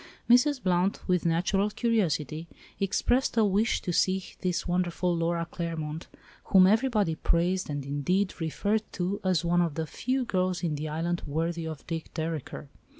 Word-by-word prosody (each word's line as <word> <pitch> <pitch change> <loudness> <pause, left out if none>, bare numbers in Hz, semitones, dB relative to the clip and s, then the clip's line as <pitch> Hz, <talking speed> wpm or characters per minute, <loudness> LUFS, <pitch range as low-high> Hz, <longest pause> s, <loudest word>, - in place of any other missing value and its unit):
Mrs. 260 +4 +5
Blount, 180 +1 +1
with 180 -2 +2
natural 185 +5 +1
curiosity, 170 - 0 0.3
expressed 235 +6 +1
a 220 - +5
wish 205 +4 +1
to 180 - -2
see 190 +2 +2 0.2
this 180 0 -1
wonderful 175 0 0
Laura 170 0 0
Claremont—whom 165 +3 -1
everybody 215 -3 +2
praised 175 +3 0
and 145 -2 -3
indeed 180 +8 -1
referred 200 +7 0
to 190 +2 -2
as 180 -3 +1
one 175 +1 +3
of 165 -4 -1
the 160 - -2
few 255 - -2
girls 185 -4 -1
in 165 -3 0
the 150 +1 -3
island 170 +3 -2
worthy 165 +2 -2
of 155 -3 -7
Dick 165 -1 -5
Dereker. 160 -3 -4
175 Hz, 150 wpm, -28 LUFS, 165-195 Hz, 0.3 s, Mrs